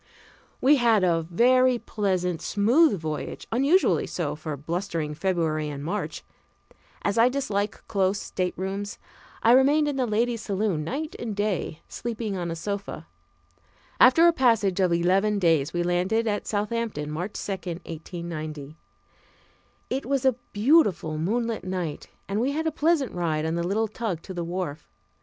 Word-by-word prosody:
We 285 +3 +6
had 230 -5 +3
a 170 -2 +3
very 255 +6 +4
pleasant, 185 -7 -1
smooth 225 - +3
voyage, 155 -1 -5
unusually 280 +11 +3
so 160 -5 -3
for 155 -1 -5
blustering 165 0 -3
February 155 -3 -1
and 140 -1 -6
March. 200 +7 -3 0.8
As 200 +2 +1
I 235 +2 +6
dislike 215 -6 -2
close 195 -1 +1
staterooms, 190 +2 -3 0.5
I 230 - +6
remained 285 +4 +5
in 285 -2 -2
the 255 -2 +1
ladies' 230 +1 0
saloon 195 -6 -1
night 295 - -4
and 225 -3 -4
day, 200 -6 -2
sleeping 225 -3 -4
on 175 -2 -3
a 165 - -3
sofa. 200 +4 -5 0.9
After 295 +7 +7
a 340 - +5
passage 225 - +2
of 185 -2 +3
eleven 190 +5 +2
days 165 -7 +2
we 175 0 -1
landed 180 +6 +1
at 210 -2 -2
Southampton, 210 -7 -2
March 175 +7 -4
2, - - -5
1890. 165 -4 -6 1.2
It 265 -1 -2
was 275 -1 0
a 260 - +5 0.2
beautiful 205 - +3
moonlight 225 +6 -1
night 180 -5 -4 0.2
and 200 +3 -1
we 270 +3 0
had 320 +2 -2
a 320 - +1
pleasant 310 -3 +1
ride 160 -3 -1
on 160 - -1
the 170 - -1
little 205 +6 0
tug 215 -6 -4
to 190 - -8
the 175 -1 -3
wharf. 170 -3 -4
200 Hz, 150 wpm, -26 LUFS, 170-235 Hz, 1.2 s, After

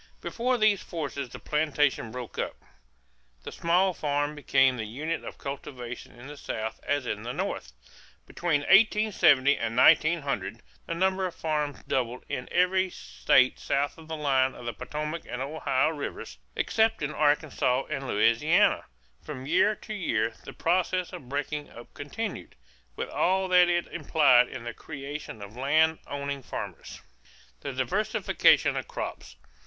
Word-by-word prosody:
Before 250 +2 -1
these 215 -3 +3
forces 140 -5 -5
the - - -9
plantation 150 -5 0
broke 125 0 -7
up. - - -2 0.9
The - - -7
small 180 +3 +2
farm 145 -1 -1
became 135 -3 +3
the 110 -2 -4
unit 155 +9 -3
of - - -8
cultivation 125 -3 -7
in 120 - -11
the 145 +1 -9
South 110 -4 -4
as 145 -2 -1
in 105 -3 -3
the 120 +2 -5
North. - - -3 0.5
Between 165 -4 0
1870 195 -8 +4
and 115 +1 -2
1900 155 - +3 0.2
the 170 - -2
number 190 +1 +1
of 180 - -9
farms 150 -3 -2
doubled 125 -1 -2
in 125 - -4
every 185 +1 +2
state 130 -6 +2
south 140 +1 0
of 160 - -13
the 160 - -4
line 135 -3 +1
of 120 - -10
the 120 - -3
Potomac 150 +8 -4
and 125 - -4
Ohio 140 0 0
rivers, 145 - -6 0.2
except 225 -5 +1
in 145 +1 -2
Arkansas 145 -3 +1
and 135 0 -3
Louisiana. 125 - +3 0.4
From 130 -4 -7
year 185 +8 +3
to 215 - -8
year 115 - 0
the - - -8
process 180 +1 0
of 125 - -9
breaking 145 +1 -3
up 120 - -13
continued, 195 +9 -6 0.4
with - - -4
all 190 +1 +1
that 180 -1 +6
it 175 0 +1
implied 145 -6 +4
in 130 -3 -7
the 120 -1 -5
creation 140 -6 -7
of 100 +2 -11
land 155 +5 +2
owning 140 0 -4
farmers. - - -7 0.6
=The - - -5
Diversification - - +2
of - - -3
Crops. - - -6
145 Hz, 150 wpm, -27 LUFS, 130-170 Hz, 0.9 s, that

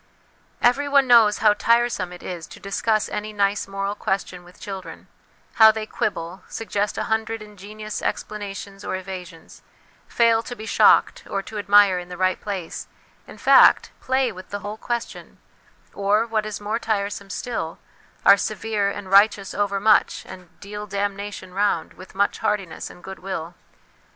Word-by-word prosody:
Everyone 280 +2 +4
knows 230 -4 +6
how 210 - +7
tiresome 230 -4 +1
it 180 - -11
is 175 -3 -6
to - - -13
discuss 215 +2 0
any 215 +1 -4
nice 200 -1 0
moral 195 0 -3
question 190 -3 -3
with 180 +1 -18
children; 195 -2 -8 0.5
how 220 - +11
they 220 0 -1
quibble, 185 -5 -3
suggest 205 -2 -2
a - - -1
hundred 220 0 -1
ingenious 210 +1 -8
explana 205 -1 -4
tions 195 0 -9
or - - -3
evasions, 185 -3 -9 0.5
fail 230 -1 +3
to 245 - -8
be 220 - -9
shocked - - +4
or 195 - -2
to 215 +1 -6
admire 205 -2 +5
in 175 0 -9
the 180 - -7
right 185 0 +1
place 190 -5 -5 0.4
in - - -12
fact, - - +6
play 260 -1 +1
with 185 -2 -11
the 205 0 -5
whole 210 +1 -6
ques 235 +1 -2
tion; - - -13 0.6
or, 205 +3 +2
what 220 -2 -1
is 215 - -5
more 210 +2 -2
tiresome 200 -3 -2
still, 180 -4 -4 0.5
are 200 - +8
severe 215 -1 -1
and 200 -1 -7
righteous 200 0 +4
overmuch, 205 +1 +2
and 180 -2 -12
'deal 210 +1 -7
damnation 200 -1 -4
round' 200 -4 0
with 185 - -14
much 200 +1 +1
heartiness 195 -5 -2
and 175 - -15
goodwill. 185 -3 -6
205 Hz, 160 wpm, -23 LUFS, 190-215 Hz, 0.6 s, how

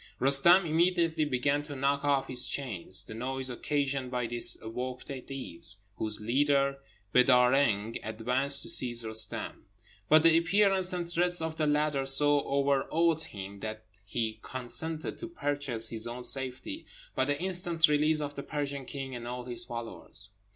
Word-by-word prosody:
Roostem 140 +8 +5
immediately 165 -1 +2
began 145 +1 0
to 145 -1 -8
knock 140 +1 0
off 140 -2 +1
his 125 -1 +2
chains. 100 -8 -3
The - - -9
noise 130 +3 -2
occasioned 140 0 -2
by 125 -1 -2
this 120 0 -1
awoke 125 +3 -6
the 135 -2 -6
Deevs, 130 -10 -4 0.2
whose 110 -1 +2
leader, 140 +4 +1 0.3
Beedâr 125 -1 +5
Reng, 115 -5 +1
advanced 125 +6 +1
to - - -1
seize 120 -2 +2
Roostem; 110 -1 -2 0.4
but 155 +1 +6
the 165 -1 +6
appearance 190 +1 +2
and 175 -2 -3
threats 175 +1 +2
of 160 0 -2
the 155 - 0
latter 150 -2 0
so 145 +1 +5
overawed 140 +4 +1
him 100 -7 -8
that 110 +1 -7 0.2
he 110 +1 -3
consented 155 +6 -2
to 345 - -6
purchase 145 - -2
his 115 0 -3
own 120 +1 -6
safety 135 - -1 0.3
by - - 0
the 145 0 -1
instant 175 -2 +3
release 150 +1 +2
of 145 -1 -4
the 140 - -6
Persian 140 -2 -4
king 135 -1 -6
and 120 0 -7
all 125 0 -6
his 120 -1 -4
followers. 115 -4 -7
135 Hz, 160 wpm, -29 LUFS, 120-150 Hz, 0.4 s, but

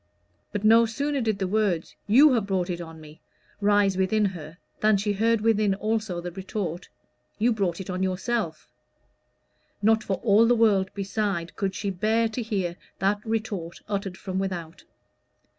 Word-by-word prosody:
But 205 - -3
no 225 +2 +6
sooner 280 +5 -1
did 220 -3 0
the 190 -1 -1
words 195 -5 0
"You 265 +7 +7
have 220 -5 0
brought 185 -2 0
it 175 0 -4
on 165 -1 -9
me" 155 0 -14 0.4
rise 205 -2 +3
within 205 +3 +2
her 165 -4 -5 0.2
than 215 -1 +4
she 205 +1 0
heard 225 +2 +2
within 215 -3 +2
also 215 -3 -2
the 175 +1 -5
retort, 185 -2 -5 0.5
"You 230 +3 +2
brought 190 -5 -1
it 190 - -6
on 185 0 -3
yourself." 190 -2 -2 1.2
Not 220 +1 +4
for 195 - -1
all 220 0 +5
the 245 - +4
world 205 -5 +3
beside 195 -3 -2
could 195 -2 -2
she 200 -2 -2
bear 220 +5 +1
to 220 +3 -4
hear 190 -6 -2 0.2
that 205 +2 0
retort 215 -7 -3
uttered 195 -2 -3
from 190 -1 -4
without. 175 -3 -5
200 Hz, 165 wpm, -26 LUFS, 185-220 Hz, 1.2 s, You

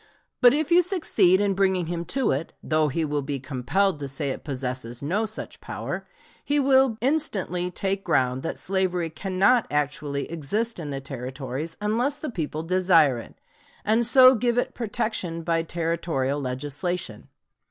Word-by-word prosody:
But 245 -1 +8
if 310 +2 -1
you 350 +1 +7
succeed 230 - +3
in 205 -1 +2
bringing 190 -2 +1
him 170 +1 -4
to 265 +2 0
it 140 +5 -3
though 155 -1 +2
he 160 +3 -1
will 150 -1 -1
be 140 0 -3
compelled 145 +8 0
to 140 - -4
say 135 +1 -2
it - - -6
possesses 125 -3 -4
no 200 +9 0
such 220 - -6
power - - -5 0.4
he 290 +1 +1
will 265 -4 +4
instantly 210 - 0
take 195 +2 -2
ground 130 0 +1
that 165 - -4
slavery 180 -3 -1
cannot 195 +7 +2
actually 145 -1 -1
exist 205 +9 -1
in 155 -3 -5
the 135 -1 -4
Territories 135 +3 -5
unless 235 +7 0
the 300 -2 -5
people 155 -5 -3
desire 165 -7 +4
it, - - -12 0.5
and 220 +3 +3
so 255 +2 +7
give 240 0 0
it 245 - 0
protection 200 -7 -2
by 165 0 +1
Territorial 165 -4 -1
legislation. 140 - -3
170 Hz, 160 wpm, -25 LUFS, 145-215 Hz, 0.5 s, But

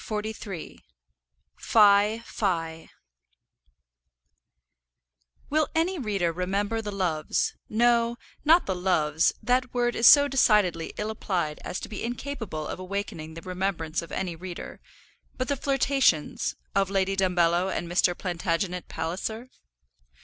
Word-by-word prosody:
[ILLUSTRATION: 210 -4 -5 1.0
(untitled)] 200 -6 +3 2.6
Will 310 0 +2
any 340 +2 +1
reader 200 -8 0
remember 200 +6 -1
the 210 -1 -5
loves, 175 -6 -1 0.2
no, 235 +1 +2 0.3
not 325 +4 +5
the 190 - -1
loves; 165 -4 +2
that 250 0 +1
word 240 0 +1
is 230 - +5
so 285 -1 +9
decidedly 210 -11 +2
ill 210 +1 -2
applied 175 -8 -2
as - - -4
to - - -7
be 210 - -6
incapable 230 - -4
of - - -5
awakening 185 -4 -5
the 165 - -9
remembrance 180 -3 -2
of 170 - -11
any 180 -3 -3
reader; 175 +1 -8 0.6
but 255 - -2
the 285 - 0
flirtations 270 - +1 0.2
of 195 -1 +2
Lady 195 0 0
Dumbello 180 -1 +2
and 175 - -3
Mr. 175 0 +2
Plantagenet 180 0 -2
Palliser? 205 +9 -4
195 Hz, 120 wpm, -26 LUFS, 175-230 Hz, 2.6 s, so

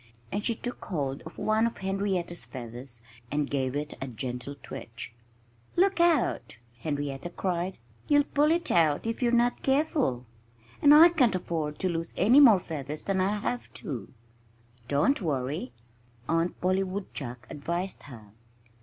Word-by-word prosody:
And 205 +1 -2
she 235 - +1
took 245 +2 -6
hold 140 -6 -2
of 160 - -12
one 215 +2 +2
of 235 - -6
Henrietta's 190 -3 -2
feathers 120 -1 -9 0.3
and 145 -1 0
gave 135 -2 -1
it 150 +1 -3
a 135 - -3
gentle 125 +2 -5
twitch. 115 0 -7 0.6
"Look 385 +1 +3
out!" 335 - +2 0.2
Henrietta 145 +2 -3
cried. 180 +1 -2 0.3
"You'll 290 -1 +5
pull 290 +1 +2
it 335 +1 +1
out 155 -1 +3
if 230 +3 -3
you're 240 -1 +3
not 240 0 +2
careful. 270 - +1 0.6
And 290 - +7
I 315 +3 +10
can't 260 - +3
afford 160 -4 -2
to 190 - 0
lose 165 -1 -3
any 230 +9 +6
more 230 -9 +8
feathers 150 -3 -6
than 195 -1 0
I 190 +2 +2
have 230 +4 -3
to." 135 - -6 0.8
"Don't 145 - +2
worry!" 135 -4 -2 0.6
Aunt 165 +2 0
Polly 185 +1 +2
Woodchuck 185 -11 -5
advised 170 +6 -3
her. 110 -5 -12
175 Hz, 150 wpm, -28 LUFS, 140-230 Hz, 0.8 s, I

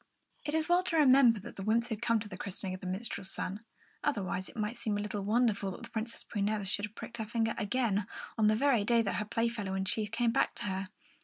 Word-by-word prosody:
It 295 +1 0
is 315 -1 +1
well 350 +1 +4
to 330 - 0
remember 260 -6 +6
that - - -10
the - - -5
wymps 230 +3 +2
had 220 -2 -3
come 230 -1 +3
to 215 - -6
the - - -8
christening 190 -1 -5
of 185 - -6
the 185 - -5
minstrel's 190 0 -4
son; 200 +3 -4 0.4
otherwise 195 -8 -1
it - - -14
might 215 +2 -1
seem 210 -3 -1
a - - -2
little 210 0 -3
wonderful 210 -1 +2
that 190 - -8
the 235 - -9
Princess 230 +1 -3
Prunella 205 -1 -1
should 205 +1 -1
have 210 +1 -13
pricked - - -6
her 220 - -3
finger 225 0 0
again, 205 -2 0 0.3
on 220 -2 +3
the 215 - +4
very 245 -3 +3
day 230 +2 +3
that 195 -4 -1
her 210 - -1
Playfellow 230 -3 -1
in 190 0 -1
chief 210 +2 +3
came 230 +2 +1
back 270 - +1
to - - -5
her. 190 -1 -2
215 Hz, 250 wpm, -32 LUFS, 200-235 Hz, 0.4 s, remember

